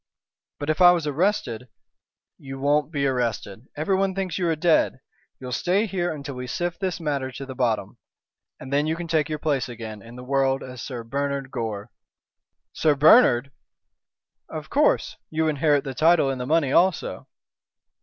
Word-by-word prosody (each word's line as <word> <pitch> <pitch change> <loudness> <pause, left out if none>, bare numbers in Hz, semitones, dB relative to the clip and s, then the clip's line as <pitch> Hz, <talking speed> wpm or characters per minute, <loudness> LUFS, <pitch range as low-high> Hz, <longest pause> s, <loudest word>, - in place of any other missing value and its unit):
"But 145 +2 -1
if 155 - -3
I 175 0 +9
was 170 -3 -1
arrested?" 150 - -1 0.7
"You 135 -1 -8
won't 145 +2 +1
be 140 -3 -1
arrested. 120 -3 -2
Everyone 190 +4 0
thinks 190 -2 -3
you 175 - 0
are 165 - +1
dead. 160 -4 +2 0.4
You'll 125 -1 -7
stay 185 - +1
here 180 -4 -2
until 140 -2 -6
we 125 0 -6
sift 175 +5 -3
this 185 -3 -2
matter 140 -5 -2
to 135 +3 -7
the 130 - -7
bottom, 120 -4 -1 0.6
and 130 +2 -7
then 145 +2 +2
you 160 - 0
can 170 0 -6
take 160 -2 +1
your 155 - -2
place 145 -4 -1
again 110 -3 -8
in 115 +2 -13
the 125 - -9
world 135 0 +1
as 125 -2 -9
Sir 125 -4 -6
Bernard 140 +2 -3
Gore." 110 -4 -4 0.8
"Sir 155 -2 +2
Bernard!" 140 - +5 1.0
"Of - - -7
course. - - +2
You 160 0 0
inherit 145 -1 +2
the 135 - -5
title 160 0 +3
and 130 -2 -4
the 125 - -4
money 155 -3 +2
also." 180 +2 +1
140 Hz, 175 wpm, -24 LUFS, 130-165 Hz, 1.0 s, I